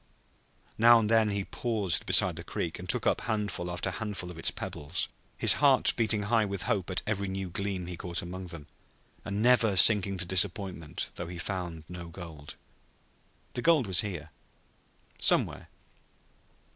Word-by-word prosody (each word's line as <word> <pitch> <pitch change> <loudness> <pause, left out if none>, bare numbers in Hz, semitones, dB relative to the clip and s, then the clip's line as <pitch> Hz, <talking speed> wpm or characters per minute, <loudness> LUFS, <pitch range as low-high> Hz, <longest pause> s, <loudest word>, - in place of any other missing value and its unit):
Now 120 +1 +8
and 110 -1 0
then 110 -2 +4
he 100 -1 -2
paused 110 -7 -1
beside - - +5
the - - -8
creek - - -4
and - - -9
took - - -1
up - - +1
handful 105 -5 -3
after 90 +2 -3
handful 100 -4 -5
of 85 - -11
its - - 0
pebbles, 75 +5 -3 0.3
his - - +8
heart - - +4
beating 110 -2 +1
high 110 +2 +2
with 100 -3 -3
hope 95 -3 -1
at 95 - -2
every 100 -2 -2
new 95 -1 -5
gleam 95 -1 -3
he 90 0 -6
caught 85 0 -3
among 90 +2 -7
them, 85 -4 -8 0.6
and 100 +2 -3
never 120 -4 +4
sinking 100 +1 +5
to 90 - +1
disappointment 95 -3 0
though 85 - -5
he 90 0 -8
found 85 -3 -5
no 85 -1 -8
gold. 80 -4 -10 1.0
The 120 - -4
gold 160 -5 +3
was 95 -3 +1
here 85 -7 -6 0.9
somewhere. - - +1
95 Hz, 165 wpm, -29 LUFS, 90-105 Hz, 1.0 s, Now